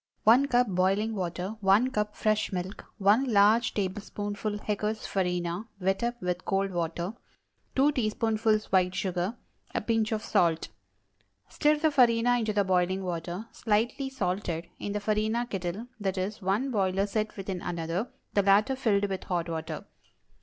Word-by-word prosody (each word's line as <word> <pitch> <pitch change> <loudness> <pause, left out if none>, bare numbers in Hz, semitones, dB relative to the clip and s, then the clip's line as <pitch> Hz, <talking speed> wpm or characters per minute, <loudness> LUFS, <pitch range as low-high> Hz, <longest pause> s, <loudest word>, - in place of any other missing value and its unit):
✠ - - -65 0.2
1 245 +6 +6
cup 245 -1 +3
boiling 195 +3 +1
water. 185 +2 -3
1 205 +6 +4
cup 210 -2 -1
fresh 215 0 +1
milk. 185 +1 -5
1 210 +6 +4
large 215 +3 +4
tablespoonful 205 +1 -3
Hecker's 210 +1 -2
Farina, 180 +1 -1
wet 190 +1 0
up 240 0 -1
with 180 0 -2
cold 195 -1 0
water. 170 +2 -2 0.6
2 275 +3 +4
teaspoonfuls 220 -3 +1
white 185 -1 +3
sugar. 185 +4 -2 0.4
A - - +3
pinch 225 -1 0
of 220 -1 -1
salt. 165 -2 +1 0.8
Stir 300 +1 +2
the 315 +1 +2
farina 245 -2 +4
into 220 -2 0
the 205 -1 +2
boiling 185 0 +1
water 175 +3 -4
(slightly 235 +5 0
salted) 180 -9 -2
in 205 - -3
the 210 - -1
farina 215 +3 0
kettle 195 0 -4 0.2
(i. 195 - +2
e., 190 +1 -2
one 210 +8 0
boiler 195 -3 +1
set 215 +1 -2
within 190 -2 -4
another, 170 +6 -3 0.2
the 200 - +4
latter 205 +7 +4
filled 210 -6 +2
with 190 -2 -4
hot 175 -2 -1
water). 160 -1 -4
205 Hz, 155 wpm, -28 LUFS, 185-225 Hz, 0.8 s, 1